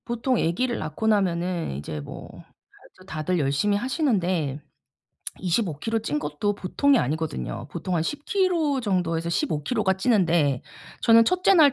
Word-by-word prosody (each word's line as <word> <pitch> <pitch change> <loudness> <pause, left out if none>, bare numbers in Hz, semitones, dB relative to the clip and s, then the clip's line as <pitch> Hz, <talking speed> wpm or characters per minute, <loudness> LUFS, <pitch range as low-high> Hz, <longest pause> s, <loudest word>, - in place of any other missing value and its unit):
보통 240 +1 0
애기를 240 +9 0
낳고 155 +8 -3
나면은 180 - 0
이제 75 +1 -5
뭐 70 - -9 0.4
그래도 185 - -20
다들 160 +2 -1
열심히 145 +9 +1
하시는데 185 - 0 0.8
25 175 -4 -1
킬로 225 +6 -1
찐 150 -9 -2
것도 150 +8 -2
보통이 265 +8 +2
아니거든요. 145 -4 -3
보통 180 +3 -3
한 160 - +1
10 290 - -4
킬로 340 -8 +1
정도에서 175 -6 -1
15 170 - -1
킬로가 205 - +1
찌는데 175 - +2 0.4
저는 230 0 +7
1 365 +7 0
째 390 - +6
낳을 300 -6 +6
185 Hz, 295 characters per minute, -25 LUFS, 160-235 Hz, 0.8 s, 저는